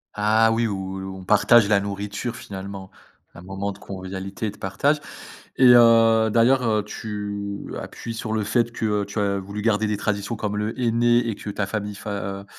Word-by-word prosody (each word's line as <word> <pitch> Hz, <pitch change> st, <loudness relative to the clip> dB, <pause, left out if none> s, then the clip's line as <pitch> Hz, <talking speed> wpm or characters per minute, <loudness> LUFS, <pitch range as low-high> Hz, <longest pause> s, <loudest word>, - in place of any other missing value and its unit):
Ah 110 Hz, +2 st, +3 dB
oui, 115 Hz, 0 st, +1 dB
où 95 Hz, -2 st, -4 dB
où 95 Hz, 0 st, -6 dB
on 95 Hz, -, -10 dB
partage 105 Hz, +2 st, +5 dB
la 100 Hz, -1 st, +4 dB
nourriture, 100 Hz, +4 st, -4 dB
finalement. 100 Hz, -5 st, -8 dB, 0.4 s
Un 85 Hz, -, -11 dB
moment 95 Hz, +2 st, -4 dB
de 100 Hz, -, -12 dB
convivialité 95 Hz, +2 st, -6 dB
et 105 Hz, -, -2 dB
de 105 Hz, -, -17 dB
partage 115 Hz, +11 st, +1 dB, 0.6 s
et 130 Hz, -2 st, +6 dB
heu, 115 Hz, -2 st, +6 dB
d'ailleurs, 125 Hz, +3 st, +4 dB
heu, 110 Hz, -2 st, +1 dB
tu 100 Hz, -1 st, -6 dB
appuies 115 Hz, -, -7 dB
sur 110 Hz, -1 st, -5 dB
le 110 Hz, -1 st, 0 dB
fait 120 Hz, +3 st, 0 dB
que, 115 Hz, -, -4 dB, 0.2 s
heu, -, -, -2 dB
tu 100 Hz, +1 st, -4 dB
as 100 Hz, -1 st, 0 dB
voulu 100 Hz, +2 st, -6 dB
garder 110 Hz, -1 st, +2 dB
des 105 Hz, -, -1 dB
traditions, 100 Hz, +2 st, -2 dB
comme 105 Hz, -2 st, -3 dB
le 105 Hz, +1 st, -2 dB
henné 120 Hz, -1 st, +3 dB
et 110 Hz, -, -2 dB
que -, -, -9 dB
ta 100 Hz, 0 st, -2 dB
famille, 105 Hz, +1 st, -4 dB
fa 100 Hz, +1 st, -7 dB
heu, 100 Hz, -1 st, -4 dB
105 Hz, 200 wpm, -23 LUFS, 100-115 Hz, 0.6 s, et